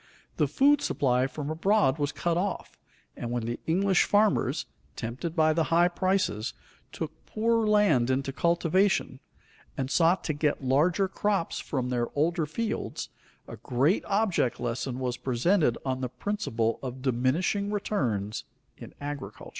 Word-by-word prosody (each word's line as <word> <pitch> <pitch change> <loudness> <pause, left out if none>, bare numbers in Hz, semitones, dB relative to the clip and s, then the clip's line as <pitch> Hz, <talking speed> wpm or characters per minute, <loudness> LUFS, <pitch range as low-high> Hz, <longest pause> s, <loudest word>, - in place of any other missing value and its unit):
The 150 - +2
food 280 - +4
supply 130 -1 +1
from 150 +1 -5
abroad 160 -4 +2
was 145 0 0
cut 170 +2 -1
off, 190 +3 -3 0.4
and 120 - -5
when 120 -1 -2
the 120 +1 -3
English 190 +3 +3
farmers, 210 0 +2 0.3
tempted 130 +9 -5
by 155 -2 +4
the 165 0 +1
high 170 +2 +4
prices, 185 - 0 0.4
took 160 -2 -4 0.2
poorer 225 0 +1
land 200 - +3
into 135 +1 0
cultivation, 170 -2 +1 0.6
and 135 0 -2
sought 170 +5 +3
to 155 - -1
get 145 -1 -1
larger 160 +9 +2
crops 195 -2 -1
from 130 -3 -3
their 120 -1 0
older 160 +1 +1
fields, 220 +8 -3 0.4
a - - -8
great 135 - +1
object 195 - +1
lesson 120 +1 -3
was 125 -1 -2
presented 135 - +1
on 130 -1 -1
the 125 - -2
principle 120 - -2
of 130 0 -6
diminishing 140 - +1
returns 120 - -2 0.3
in - - -11
agriculture. 145 -8 -7
150 Hz, 145 wpm, -28 LUFS, 130-190 Hz, 0.6 s, food